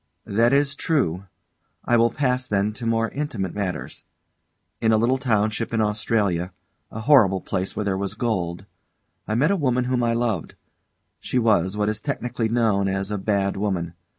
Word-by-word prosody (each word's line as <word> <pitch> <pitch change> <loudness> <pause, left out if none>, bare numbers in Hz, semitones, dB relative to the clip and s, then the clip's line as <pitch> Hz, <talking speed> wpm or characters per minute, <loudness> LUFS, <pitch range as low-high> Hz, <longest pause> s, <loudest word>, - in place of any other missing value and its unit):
_] 100 - -6
That 115 +2 +4
is 140 0 +2
true. 100 - 0 0.6
I 120 - +3
will 115 0 +4
pass, 125 0 0
then, 105 +1 0
to 115 +2 -5
more 115 0 +1
intimate 120 - -3
matters. 100 -3 -4 0.8
In 110 - +3
a 110 - +4
little 125 +4 +2
township 110 -3 0
in - - +1
Australia 105 -4 0 0.4
a 110 - -7
horrible 110 -8 +5
place 95 +1 -3
where 105 - -2
there 95 -1 0
was 100 -1 -3
gold 95 -6 -2 0.6
I 110 - -1
met 150 - +3
a - - +3
woman 125 -7 +1
whom 125 0 0
I 115 0 +2
loved. 115 -7 -2 0.6
She - - -3
was 105 -5 +2
what 105 0 +1
is 110 0 -2
technically 125 -5 -2
known 110 -4 +2
as 95 +1 -2
a 105 - -2
bad 100 -1 0
woman. 95 -4 -2
110 Hz, 180 wpm, -23 LUFS, 100-120 Hz, 0.8 s, horrible